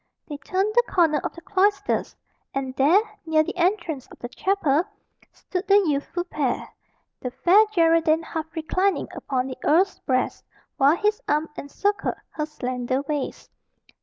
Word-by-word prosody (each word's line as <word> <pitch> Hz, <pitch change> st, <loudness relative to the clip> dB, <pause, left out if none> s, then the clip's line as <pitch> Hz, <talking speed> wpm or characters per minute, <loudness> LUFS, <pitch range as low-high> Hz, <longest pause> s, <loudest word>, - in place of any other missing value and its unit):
They 295 Hz, -, -6 dB
turned 380 Hz, +9 st, -1 dB
the 485 Hz, -, +6 dB
corner 320 Hz, -5 st, +3 dB
of -, -, -3 dB
the 335 Hz, -, -12 dB
cloisters; 400 Hz, +2 st, +1 dB, 0.4 s
and 265 Hz, -1 st, -3 dB
there, 295 Hz, +9 st, +5 dB, 0.2 s
near 320 Hz, -1 st, +3 dB
the -, -, -5 dB
entrance 345 Hz, -, 0 dB
of -, -, -15 dB
the 240 Hz, -, -7 dB
chapel, 330 Hz, -3 st, +1 dB, 0.5 s
stood 370 Hz, +1 st, -5 dB
the 395 Hz, -, +5 dB
youthful 300 Hz, +3 st, -1 dB
pair 290 Hz, -8 st, -2 dB, 0.5 s
the 250 Hz, -, -4 dB
Fair 380 Hz, -, +5 dB
Geraldine 330 Hz, -3 st, +3 dB
half 320 Hz, -1 st, -4 dB
reclining 370 Hz, +5 st, 0 dB
upon 255 Hz, -2 st, -2 dB
the 260 Hz, -1 st, -7 dB
earl's 365 Hz, +6 st, +3 dB
breast, 255 Hz, -1 st, -1 dB, 0.3 s
while 285 Hz, +3 st, +5 dB
his 420 Hz, +2 st, 0 dB
arm 300 Hz, +2 st, +1 dB
encircled 400 Hz, +9 st, -2 dB, 0.2 s
her 300 Hz, -1 st, -3 dB
slender 255 Hz, -2 st, -2 dB
waist. 290 Hz, -2 st, -4 dB
320 Hz, 150 wpm, -24 LUFS, 280-375 Hz, 0.5 s, the